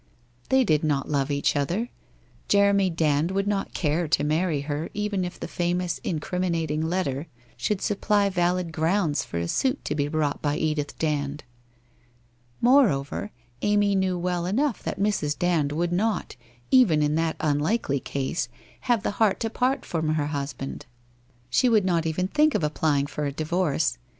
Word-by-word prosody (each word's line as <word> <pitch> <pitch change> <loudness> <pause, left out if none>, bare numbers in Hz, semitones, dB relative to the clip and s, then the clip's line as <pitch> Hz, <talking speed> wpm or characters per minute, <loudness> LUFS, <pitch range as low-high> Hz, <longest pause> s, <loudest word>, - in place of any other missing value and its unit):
They 265 0 +4
did 155 - +2
not 145 -3 0
love 140 -1 +1
each 140 0 +1
other. 175 - -1 0.6
Jeremy 200 -1 +4
Dand 155 -1 +1
would 195 +1 0
not 200 -1 -2
care 160 +1 0
to 150 - +2
marry 155 0 +1
her 145 +2 -3
even 210 -2 -1
if 180 0 -6
the - - -5
famous 175 0 -1
incriminating 165 -2 -1
letter 160 -3 -1 0.3
should 210 -3 -1
supply 205 0 +2
valid 180 -2 0
grounds 160 -1 +1
for - - -6
a 85 0 -1
suit 265 - 0
to - - -1
be 145 -1 0
brought 150 -1 -1
by 145 0 0
Edith 150 -2 -2
Dand. 145 -2 -2 1.2
Moreover, 210 - +3 0.3
Amy 205 -1 +2
knew 190 -2 +1
well 175 0 -1
enough 250 +6 0
that - - -4
Mrs. 195 -8 0
Dand 170 -5 +1
would 170 +3 -1
not, 215 +4 -1 0.4
even 195 - +5
in 150 0 +1
that 160 0 0
unlikely 145 - 0
ease, 140 +5 -1 0.4
have 235 -4 +3
the - - 0
heart 205 -3 +3
to 225 -2 -1
part 255 +3 0
from 160 -2 -1
her 150 -2 0
husband. 140 -1 -5 0.6
She 250 - +4
would 215 -4 +3
not 170 -3 +1
even 180 +4 -1
think 300 +6 +3
of - - 0
applying 150 -2 +1
for 150 +1 -4
a - - -2
divorce. 155 -3 0
170 Hz, 165 wpm, -25 LUFS, 150-200 Hz, 1.2 s, even